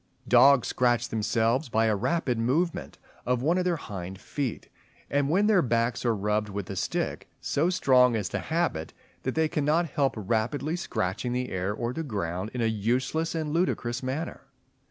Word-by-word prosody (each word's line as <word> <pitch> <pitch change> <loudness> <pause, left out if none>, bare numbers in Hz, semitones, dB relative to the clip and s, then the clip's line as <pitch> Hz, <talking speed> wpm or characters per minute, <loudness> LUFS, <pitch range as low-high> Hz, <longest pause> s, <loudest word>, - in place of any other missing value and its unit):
Dogs 140 -3 +6
scratch 120 -1 +1
themselves 115 +5 +1
by 110 0 +2
a 110 -1 +2
rapid 125 - 0
movement 155 +9 -1 0.3
of 125 0 0
one 170 +5 +2
of 180 - -1
their 180 -1 +2
hind 95 - -7
feet; 135 -1 -4 0.4
and 140 0 +1
when 190 +6 +3
their 210 -4 +5
backs 120 -2 0
are 115 -2 +2
rubbed 105 +1 0
with 100 -1 -5
a - - -4
stick, 90 - -2
so 155 +5 +1
strong 130 -9 +4
is 105 -4 -1
the - - -2
habit, 160 - -1 0.3
that 130 - -3
they 160 0 +3
cannot 155 +3 +1
help 140 -2 +1
rapidly 120 - -1
scratching 110 - -2
the 125 0 -2
air 95 +2 -2
or 115 +3 -3
the 165 - -3
ground 100 - -3
in 125 - -1
a - - +2
useless 125 +10 0
and 155 -2 -2
ludicrous 130 -9 0
manner. 135 +6 -4
125 Hz, 175 wpm, -27 LUFS, 110-155 Hz, 0.4 s, Dogs